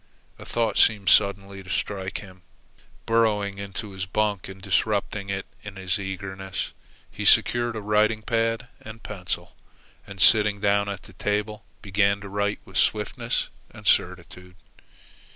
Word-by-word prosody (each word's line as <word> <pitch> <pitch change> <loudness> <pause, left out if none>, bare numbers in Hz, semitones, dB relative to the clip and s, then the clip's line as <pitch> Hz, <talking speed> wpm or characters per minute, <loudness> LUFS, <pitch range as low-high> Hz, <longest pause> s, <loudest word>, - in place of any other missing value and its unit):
A - - -10
thought 115 -3 0
seemed 100 -4 +4
suddenly 100 -1 +3
to 95 - -13
strike 95 +1 -3
him. 95 -2 -14 0.6
Burrowing 105 -3 +1
into 100 +1 -6
his 95 0 -5
bunk 105 0 -1
and 95 0 -10
disrupting 100 +1 0
it 95 0 -3 0.2
in 105 -1 -9
his 95 +1 -2
eagerness, 95 0 -5 0.4
he - - -6
secured 120 -1 +4
a 110 - -4
writing 105 +1 +2
pad 115 +1 0
and 110 0 -11
pencil, 95 -4 -4 0.5
and 100 0 -10
sitting 105 +1 +5
down 100 0 +2
at 100 -2 -5
the 95 - -15
table, 105 +3 -2 0.2
began 100 0 +2
to 100 - -8
write 100 +1 -1
with - - -7
swiftness - - 0 0.2
and - - -14
certitude. 90 0 0
100 Hz, 145 wpm, -25 LUFS, 95-105 Hz, 0.6 s, sitting